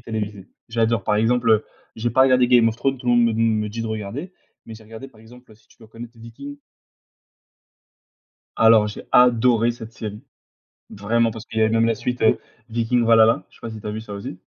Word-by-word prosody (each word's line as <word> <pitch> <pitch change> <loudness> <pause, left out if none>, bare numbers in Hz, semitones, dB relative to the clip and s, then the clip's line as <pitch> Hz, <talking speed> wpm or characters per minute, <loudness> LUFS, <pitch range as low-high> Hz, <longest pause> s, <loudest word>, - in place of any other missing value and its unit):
télévisée. 105 -4 -6 0.2
J'adore, 115 -3 0
par 105 - +1
exemple, 115 +2 +1
heu 110 -1 +3 0.3
j'ai 115 +2 -2
pas 130 +3 +4
regardé 130 -2 +3
Game 120 -2 +5
of 110 - -4
Thrones. 135 +2 -1
Tout 125 - -11
le 120 - +3
monde 120 0 +4
me 115 - +1
d 110 - -3
me 110 -2 +1
dit 115 +2 -6
de - - -4
regarder. 110 - -6 0.3
Mais 115 - -9
j'ai 110 - -14
regardé, 115 +4 -10
par 110 -4 -21
exemple 120 0 -17
si 110 - -29
tu - - -25
dois 110 - -17
connaître 115 +1 -12
Vikings? 140 +5 -11 2.0
Alors, 110 -1 +5
j'ai 105 - -9
adoré 120 -1 +4
cette 115 -1 -11
série. 105 -1 -8 0.7
Vraiment. 115 +3 0
Parce 110 0 -9
qu'il 110 - -6
y 110 - +3
avait 110 - +2
même 115 0 +2
la 115 - +1
suite, 125 +2 -4
heu, 110 - +3 0.3
Vikings 115 +1 0
Valhalla. 115 0 +4
Je - - -22
sais - - -23
pas 115 - -7
si 110 -1 -9
tu - - -10
as 105 - -3
vu 110 - -5
ça 110 -2 -10
aussi? 100 0 -7
115 Hz, 225 wpm, -21 LUFS, 110-120 Hz, 2.0 s, Game